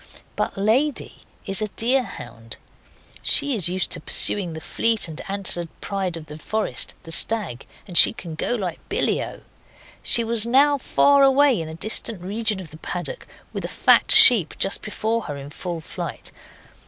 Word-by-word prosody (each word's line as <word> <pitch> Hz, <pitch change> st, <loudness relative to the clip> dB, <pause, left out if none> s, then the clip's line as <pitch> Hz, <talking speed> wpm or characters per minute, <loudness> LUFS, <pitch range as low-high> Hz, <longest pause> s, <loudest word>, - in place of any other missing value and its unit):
But -, -, -4 dB
Lady 245 Hz, +9 st, -2 dB, 0.2 s
is 195 Hz, +1 st, +1 dB
a 215 Hz, -, -2 dB
deer 245 Hz, +6 st, 0 dB
hound. 115 Hz, -, -11 dB, 0.6 s
She 285 Hz, -1 st, +1 dB
is 190 Hz, -7 st, +2 dB
used 185 Hz, +1 st, -2 dB
to -, -, -2 dB
pursuing 185 Hz, -5 st, +2 dB
that 160 Hz, -, -9 dB
fleet 225 Hz, -4 st, 0 dB
and 160 Hz, -1 st, -8 dB
antlered 190 Hz, -3 st, 0 dB
pride 190 Hz, -4 st, -5 dB
of 160 Hz, -, -11 dB
the 150 Hz, 0 st, -12 dB
forest 215 Hz, +7 st, -4 dB
the 165 Hz, -, -7 dB
stag 185 Hz, -, +1 dB, 0.2 s
and 180 Hz, -, -11 dB
she -, -, +8 dB
can 185 Hz, -9 st, -10 dB
go 205 Hz, +9 st, -4 dB
like 185 Hz, -7 st, -6 dB
billyo. -, -, -3 dB, 0.6 s
She 235 Hz, -, +1 dB
was 230 Hz, 0 st, +1 dB
now 280 Hz, +3 st, +2 dB
far 280 Hz, +2 st, +2 dB
away 270 Hz, -5 st, +2 dB
in 160 Hz, -, -8 dB
a 160 Hz, -, -9 dB
distant 215 Hz, +1 st, -3 dB
region 210 Hz, +1 st, -2 dB
of 175 Hz, -5 st, -11 dB
the 155 Hz, -, -13 dB
paddock, -, -, -8 dB, 0.3 s
with -, -, -6 dB
a -, -, -4 dB
fat -, -, +1 dB
sheep 210 Hz, -, +9 dB
just 195 Hz, -, -1 dB
before 220 Hz, +2 st, -4 dB
her 145 Hz, -, -6 dB
in 140 Hz, +1 st, -11 dB
full 170 Hz, 0 st, -7 dB
flight. -, -, -8 dB
200 Hz, 175 wpm, -21 LUFS, 165-235 Hz, 0.6 s, sheep